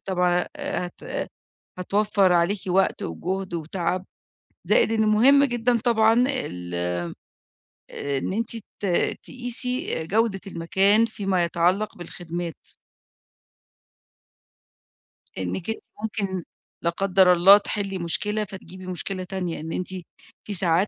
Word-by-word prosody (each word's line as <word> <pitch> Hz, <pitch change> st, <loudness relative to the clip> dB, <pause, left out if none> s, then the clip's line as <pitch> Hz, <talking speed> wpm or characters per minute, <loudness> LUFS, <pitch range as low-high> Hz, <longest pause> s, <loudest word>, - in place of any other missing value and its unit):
طبعًا 180 Hz, -2 st, +1 dB
هت 285 Hz, -12 st, -4 dB, 0.5 s
هتوفَّر 200 Hz, 0 st, +2 dB
عليكِ 175 Hz, +3 st, +2 dB
وقت 190 Hz, +1 st, +2 dB
وجهد 185 Hz, -, -3 dB
وتعب، 170 Hz, +3 st, -2 dB, 0.6 s
زائد -, -, +3 dB
إن 220 Hz, -1 st, +2 dB
مهم 270 Hz, +7 st, +6 dB
جدًا 240 Hz, -2 st, +1 dB
طبعًا 225 Hz, +1 st, +4 dB
ال 90 Hz, -, -2 dB, 1.0 s
إن 140 Hz, +4 st, -2 dB
أنتِ 230 Hz, +3 st, -2 dB, 0.3 s
ت 200 Hz, -, 0 dB, 0.4 s
تقيسي 250 Hz, -3 st, -1 dB
آآ -, -, -6 dB
جودة 210 Hz, +2 st, +1 dB
المكان 195 Hz, +6 st, +3 dB
فيما 195 Hz, -5 st, 0 dB
يتعلق 180 Hz, +5 st, +1 dB
بالخدمات. 175 Hz, -1 st, -5 dB, 2.8 s
إنِك 95 Hz, -, -3 dB
أنتِ 220 Hz, -, -2 dB, 0.2 s
ممكن- 195 Hz, -5 st, -2 dB, 0.4 s
لا 170 Hz, -, +3 dB
قدر 185 Hz, +1 st, +4 dB
الله- 185 Hz, +3 st, +8 dB
تحلي 195 Hz, -2 st, -2 dB
مشكلة، 210 Hz, +5 st, -1 dB
فتجيبي 185 Hz, -1 st, -10 dB
مشكلة 185 Hz, +1 st, -4 dB
تانية، 180 Hz, -4 st, -4 dB
إن 160 Hz, +1 st, -6 dB
أنتِ 180 Hz, -, -3 dB, 0.6 s
في 210 Hz, -, -5 dB
ساعات 180 Hz, +1 st, +2 dB
190 Hz, 110 wpm, -24 LUFS, 175-215 Hz, 2.8 s, الله